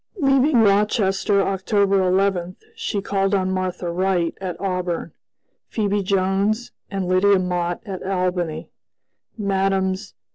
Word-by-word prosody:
Leaving 275 -4 +4
Rochester, 200 -1 +2
October 195 +1 +1
11, 185 -1 +1 0.2
she 345 - -3
called 195 0 +1
on 190 -1 0
Martha 185 -2 -2
Wright 180 -1 0
at 185 -2 -4
Auburn; 180 -3 -2 0.6
Phebe 205 -2 0
Jones 195 +4 0 0.2
and 195 -2 -3
Lydia 190 +2 +4
Mott 175 -1 -1
at 190 -3 -6
Albany; 180 -4 -2 0.7
Mmes. 195 0 0
195 Hz, 110 wpm, -22 LUFS, 185-200 Hz, 0.7 s, Leaving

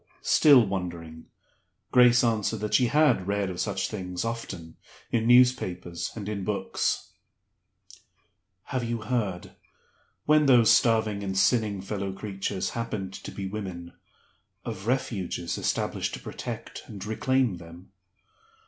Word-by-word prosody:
Still 140 -6 +6
wondering, 85 -4 -5 0.6
Grace 125 -1 +6
answered 110 -2 0
that 105 - -3
she 125 - +4
had 135 -9 +3
read 100 -1 0
of 90 - -7
such - - -1
things 90 -2 -4
often, 100 -8 -6 0.3
in 115 -1 +1
newspapers 105 -9 +3
and 105 -3 -6
in 105 -2 -3
books. 95 -1 -2 1.5
"Have 130 -3 -3
you 115 -1 -3
heard 105 -7 -2 0.7
when 150 -1 +4
those 120 -4 +6
starving 110 -3 +3
and 95 -1 -3
sinning 105 -2 +2
fellow 100 0 -4
creatures 95 -1 -3
happened 105 -5 -4
to - - -8
be 100 - -6
women 95 -4 -6 0.7
of 95 +3 -6
Refuges 100 -9 -2
established - - -1
to - - -9
protect - - -7
and 100 -1 -8
reclaim 120 -1 +1
them?" 85 +2 -13
105 Hz, 125 wpm, -27 LUFS, 95-120 Hz, 1.5 s, Still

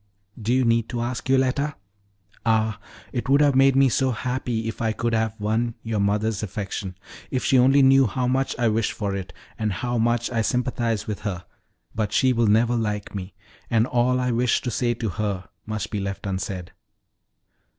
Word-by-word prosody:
"Do 110 +3 -1
you 130 0 +3
need 115 -1 +2
to 120 - -3
ask, 120 +1 -4
Yoletta? 135 +2 +2 0.7
Ah, 110 -2 +1 0.3
it 125 0 -3
would 140 +1 +5
have 145 -1 +4
made 135 0 +5
me 135 0 +6
so 130 +2 +1
happy 125 -2 -2
if 115 - -5
I 110 -1 +1
could 120 +1 -1
have 110 -1 0
won 110 +3 0
your 110 -2 -2
mother's 105 +2 0
affection! 100 -3 -5 0.3
If 130 -2 -2
she 130 - +4
only 135 +2 +5
knew 135 -1 +6
how 125 +4 -1
much 130 +2 0
I 120 -2 +2
wish 110 0 +1
for 100 -2 -2
it, 95 -1 -5 0.3
and 110 -1 0
how 120 +5 -2
much 120 +1 +1
I 115 -2 +1
sympathize 120 -2 -1
with 105 -2 -4
her! 95 -4 -4 0.5
But 105 -2 -2
she 130 -1 +4
will 115 -2 +2
never 115 +3 +3
like 105 -3 -2
me, 95 -1 -6 0.3
and 115 -1 +3
all 125 0 +1
I 125 0 0
wished 120 +1 +1
to 125 - -2
say 120 0 0
to 115 -1 -3
her 100 -1 -3 0.2
must 110 0 -4
be 105 - -2
left 100 0 -4
unsaid." 95 -1 -4
115 Hz, 190 wpm, -24 LUFS, 105-125 Hz, 0.7 s, me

